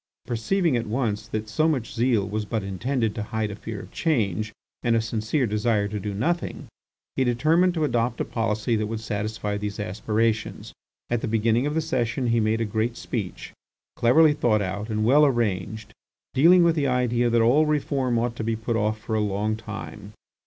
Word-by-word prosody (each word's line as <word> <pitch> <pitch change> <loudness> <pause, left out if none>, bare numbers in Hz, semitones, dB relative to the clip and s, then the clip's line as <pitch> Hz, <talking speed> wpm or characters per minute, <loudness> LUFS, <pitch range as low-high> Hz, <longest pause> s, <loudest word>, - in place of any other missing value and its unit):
Perceiving 155 - 0
at 115 -2 -1
once 110 -3 -1
that 110 -1 -4
so 155 +9 +1
much 130 -7 -1
zeal 115 -4 +1
was 105 +2 -2
but 110 0 -3
intended 110 +4 -1
to 110 - -4
hide 110 0 -2
a - - -6
fear 105 0 -7
of - - -13
change, 110 - 0 0.3
and 115 -1 +2
a - - +3
sincere 115 +4 -1
desire 105 -1 +1
to 105 +1 -4
do 105 +1 -4
nothing, 170 - -2 0.5
he 130 - +2
determined 155 +9 +2
to 160 - 0
adopt 120 -3 0
a - - 0
policy 115 0 -1
that 105 -1 -1
would 110 0 -4
satisfy 105 -1 -3
these 105 0 -4
aspirations. 110 +3 -1 0.4
At 120 -1 +1
the - - -2
beginning 115 +4 +2
of 150 - -2
the 160 - +2
session 130 -3 -1
he 115 0 +3
made 110 +1 +1
a - - +1
great 110 +3 -1
speech, 105 -7 -5 0.4
cleverly 150 +6 +5
thought 115 -8 +2
out 100 +4 -4
and 110 0 0
well 140 +6 +6
arranged, 110 -5 0 0.4
dealing 170 +6 +6
with 170 -1 +3
the 145 -3 +1
idea 120 -1 +1
that 115 0 +3
all 140 +7 +4
reform 135 -5 0
ought 120 0 -1
to - - -3
be 115 0 0
put 115 +1 -2
off 110 0 0
for 110 - -5
a 110 - +2
long 105 +1 0
time. 110 -1 -8
115 Hz, 195 wpm, -25 LUFS, 105-125 Hz, 0.5 s, well